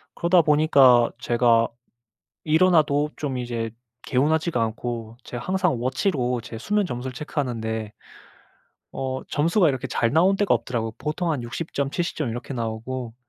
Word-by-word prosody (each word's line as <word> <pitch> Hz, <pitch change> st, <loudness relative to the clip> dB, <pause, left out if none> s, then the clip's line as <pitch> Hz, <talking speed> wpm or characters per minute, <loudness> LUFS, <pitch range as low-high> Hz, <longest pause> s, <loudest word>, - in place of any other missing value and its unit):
그러다 175 Hz, 0 st, +4 dB
보니까 140 Hz, -6 st, +5 dB
제가 120 Hz, -2 st, +3 dB, 0.8 s
일어나도 155 Hz, -3 st, +3 dB
좀 135 Hz, -4 st, -3 dB
이제 115 Hz, -2 st, -3 dB, 0.3 s
개운하지가 155 Hz, +1 st, +1 dB
않고 115 Hz, 0 st, -4 dB
제가 120 Hz, 0 st, -7 dB
항상 185 Hz, -9 st, 0 dB
워치로 130 Hz, -, 0 dB
제 115 Hz, 0 st, -8 dB
수면 205 Hz, -, 0 dB
점수를 125 Hz, -2 st, -5 dB
체크하는데 115 Hz, -6 st, -3 dB, 1.0 s
어 130 Hz, 0 st, -3 dB
점수가 165 Hz, +4 st, +2 dB
이렇게 130 Hz, -3 st, -2 dB
잘 115 Hz, +1 st, 0 dB
나온 185 Hz, +5 st, +4 dB
때가 205 Hz, -2 st, +3 dB
없더라고요. 115 Hz, -3 st, -2 dB
보통 165 Hz, +3 st, -2 dB
한 130 Hz, -5 st, -3 dB
60 135 Hz, +8 st, -6 dB
점 140 Hz, -1 st, -1 dB
70 175 Hz, +2 st, -2 dB
점 150 Hz, -6 st, -1 dB
이렇게 120 Hz, +3 st, -6 dB
나오고. 115 Hz, +1 st, -4 dB
130 Hz, 305 characters per minute, -24 LUFS, 120-155 Hz, 1.0 s, 보니까